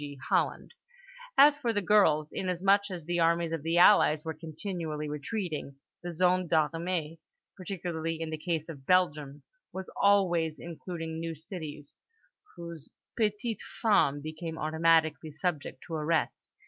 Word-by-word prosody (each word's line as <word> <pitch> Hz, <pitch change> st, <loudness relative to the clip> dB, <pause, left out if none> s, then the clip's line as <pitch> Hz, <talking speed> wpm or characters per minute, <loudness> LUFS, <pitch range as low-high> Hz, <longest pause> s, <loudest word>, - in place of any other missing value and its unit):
g. 145 Hz, -1 st, -7 dB
Holland); -, -, 0 dB, 0.6 s
as 290 Hz, +1 st, +7 dB
for 235 Hz, -, 0 dB
the 205 Hz, -, +1 dB
girls, 175 Hz, -7 st, +4 dB
inasmuch 195 Hz, +2 st, +1 dB
as 175 Hz, -4 st, -6 dB
the 175 Hz, +1 st, -1 dB
armies 170 Hz, 0 st, +2 dB
of 165 Hz, -2 st, -2 dB
the 165 Hz, +3 st, 0 dB
Allies 170 Hz, -4 st, +6 dB
were 160 Hz, -, -3 dB
continually 160 Hz, -1 st, -5 dB
retreating, 150 Hz, -1 st, -4 dB, 0.3 s
the 175 Hz, -, -5 dB
zone 180 Hz, +1 st, +2 dB
des 165 Hz, -, +1 dB, 0.2 s
armées 165 Hz, -1 st, -3 dB, 0.4 s
(particularly 170 Hz, -4 st, -4 dB
in 165 Hz, -1 st, -4 dB
the 155 Hz, -, -3 dB
case 160 Hz, -2 st, -2 dB
of 140 Hz, -5 st, -10 dB
Belgium) 150 Hz, -6 st, +1 dB, 0.3 s
was 190 Hz, 0 st, -7 dB
always 175 Hz, -6 st, +2 dB
including 165 Hz, -1 st, -6 dB
new 165 Hz, 0 st, -4 dB
cities, 155 Hz, -3 st, -8 dB, 0.6 s
whose 170 Hz, -3 st, -8 dB, 0.3 s
petites 215 Hz, 0 st, -1 dB, 0.2 s
femmes 145 Hz, -, +3 dB
became 160 Hz, +1 st, -6 dB
automatically 160 Hz, 0 st, +2 dB
subject 155 Hz, 0 st, -4 dB
to 165 Hz, -, -8 dB
arrest. 155 Hz, 0 st, -1 dB
165 Hz, 140 wpm, -29 LUFS, 155-185 Hz, 0.6 s, as